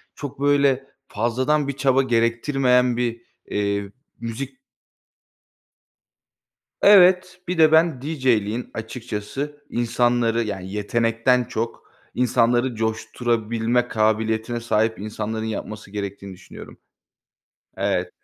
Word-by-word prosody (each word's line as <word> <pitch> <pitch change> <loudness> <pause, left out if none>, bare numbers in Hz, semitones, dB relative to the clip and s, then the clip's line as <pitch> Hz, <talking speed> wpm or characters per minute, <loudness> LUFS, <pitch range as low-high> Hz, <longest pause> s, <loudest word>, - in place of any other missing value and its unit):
çok, 140 -2 -8
böyle, 140 -2 +3 0.2
fazladan 130 +7 0
bir 140 - -2
çaba 135 -1 +2
gerektirmeyen 125 +1 +2
bir, 120 -1 -2 0.2
eee, 100 -1 -2 0.3
müzik 115 - -6 2.2
Evet, 185 -2 +6
bir 180 0 -2
de 155 -1 +6
ben 160 -4 +3
DJ'liğin 125 -6 0
açıkçası 120 +6 -6
insanları, 120 -1 +1
yani, 95 -3 -5
yetenekten 115 +4 +1
çok 115 -1 -4 0.3
insanları 120 0 +2
coşturabilme 115 +1 -1
kabiliyetine 110 +1 0
sahip 110 -1 0
insanların 110 +1 -4
yapması 110 -2 -6
gerektiğini 100 -1 -6
düşünüyorum. 90 0 -12 1.0
Evet. 90 0 -1
115 Hz, 90 wpm, -22 LUFS, 110-130 Hz, 2.2 s, Evet